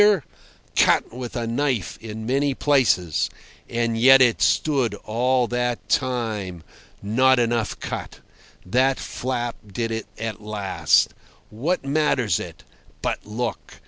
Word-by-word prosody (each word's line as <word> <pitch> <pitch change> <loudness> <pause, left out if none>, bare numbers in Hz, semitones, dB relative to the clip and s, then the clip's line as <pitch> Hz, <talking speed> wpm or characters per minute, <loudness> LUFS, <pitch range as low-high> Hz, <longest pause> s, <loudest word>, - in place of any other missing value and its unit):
Cut - - +3
with 125 0 -6
a 120 -2 -2
knife 120 -3 -1
in 110 0 -7
many 135 +3 +1
places. 125 - +2 0.4
And 115 -1 0
yet 130 +4 +7
it 125 -3 +4
stood 140 -6 +2
all 125 +3 +2
that 120 0 -2
time. 110 - -1 0.4
Not 130 +6 +4
enough 120 -2 0
cut. - - -6 0.5
That 130 +7 +2
flap 120 -2 -3
did 115 +3 -2
it 110 -2 -4
at 110 -2 -5
last. 105 -2 +1 0.4
What 140 +9 -1
matters 135 - +1
it? - - -9 0.4
But - - -2
look! 115 +2 -5
120 Hz, 120 wpm, -23 LUFS, 110-130 Hz, 0.5 s, yet